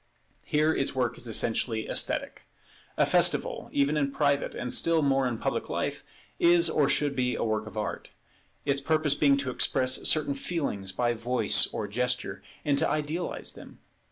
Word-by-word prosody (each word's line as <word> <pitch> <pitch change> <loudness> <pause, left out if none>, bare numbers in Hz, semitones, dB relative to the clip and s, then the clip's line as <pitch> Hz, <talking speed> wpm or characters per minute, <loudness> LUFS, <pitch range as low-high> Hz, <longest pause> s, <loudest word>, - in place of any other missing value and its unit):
Here 155 +1 +2
its 135 - -1
work 125 -2 0
is 120 - -3
essentially 115 0 -1
esthetic. - - -1 0.5
A - - +4
festival - - +2
even 140 +2 +1
in 140 -2 0
private, 140 0 0
and 125 - -3
still 165 -2 +2
more 135 -1 +2
in 120 -2 -3
public - - -3
life, - - -3 0.4
is 170 -1 +4
or 145 -3 +2
should 145 -2 +1
be 125 -1 0
a - - -2
work 110 -1 -2
of 110 0 -10
art; 105 -1 -4 0.6
its 140 -1 +1
purpose 155 0 +2
being 145 -1 +3
to 140 -2 -2
express 130 +1 +2
certain 150 -2 +1
feelings 135 - -3
by 120 -1 0
voice 120 +2 +3
or - - -4
gesture, 125 +3 -3 0.2
and 145 -2 +2
to - - +1
idealize 155 +3 -3
them. - - -13
140 Hz, 170 wpm, -27 LUFS, 125-150 Hz, 0.6 s, A